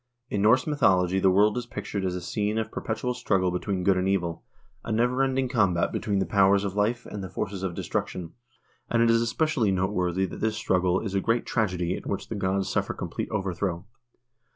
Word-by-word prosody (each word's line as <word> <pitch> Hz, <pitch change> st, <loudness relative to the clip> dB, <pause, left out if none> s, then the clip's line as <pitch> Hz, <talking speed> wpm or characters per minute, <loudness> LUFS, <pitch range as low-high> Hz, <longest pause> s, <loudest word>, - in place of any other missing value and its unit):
In 100 Hz, -, 0 dB
Norse 115 Hz, +5 st, +4 dB
mythology 95 Hz, -, +2 dB
the 95 Hz, -, +4 dB
world 105 Hz, +5 st, +4 dB
is 120 Hz, -, -8 dB
pictured 100 Hz, -3 st, -4 dB
as 90 Hz, -1 st, -1 dB
a 90 Hz, -, -4 dB
scene 105 Hz, +4 st, -1 dB
of 110 Hz, -, -2 dB
per -, -, -5 dB
petual 115 Hz, +3 st, -2 dB
struggle 95 Hz, -7 st, +1 dB
between 90 Hz, +1 st, -2 dB
good 95 Hz, 0 st, +3 dB
and 95 Hz, +1 st, +1 dB
evil, 85 Hz, -4 st, -1 dB, 0.4 s
a -, -, -5 dB
never 125 Hz, +4 st, +2 dB
ending 135 Hz, -1 st, +1 dB
combat 100 Hz, -9 st, +2 dB
be -, -, -1 dB
tween 100 Hz, -1 st, -1 dB
the 95 Hz, -, +1 dB
powers 100 Hz, 0 st, +4 dB
of 100 Hz, -1 st, -3 dB
life 110 Hz, +4 st, 0 dB
and 100 Hz, -2 st, -6 dB
the 95 Hz, -, -6 dB
forces 95 Hz, +3 st, -4 dB
of 95 Hz, -3 st, -3 dB
destruction, 85 Hz, -3 st, -3 dB, 0.6 s
and 115 Hz, -1 st, +3 dB
it 115 Hz, -, +4 dB
is 115 Hz, 0 st, +4 dB
espe 115 Hz, +7 st, +1 dB
cially 120 Hz, -10 st, +1 dB
noteworthy 95 Hz, -1 st, 0 dB
that -, -, -7 dB
this 110 Hz, 0 st, 0 dB
struggle 90 Hz, -3 st, +1 dB
is 100 Hz, -4 st, -4 dB
a 100 Hz, -, +1 dB
great 115 Hz, +3 st, +1 dB
tragedy 90 Hz, -5 st, 0 dB
in -, -, -6 dB
which 100 Hz, -, -4 dB
the 115 Hz, -, -3 dB
gods 95 Hz, -1 st, 0 dB
suffer -, -, -1 dB
complete -, -, -4 dB
overthrow. 95 Hz, -3 st, -2 dB
100 Hz, 220 wpm, -26 LUFS, 95-110 Hz, 0.6 s, Norse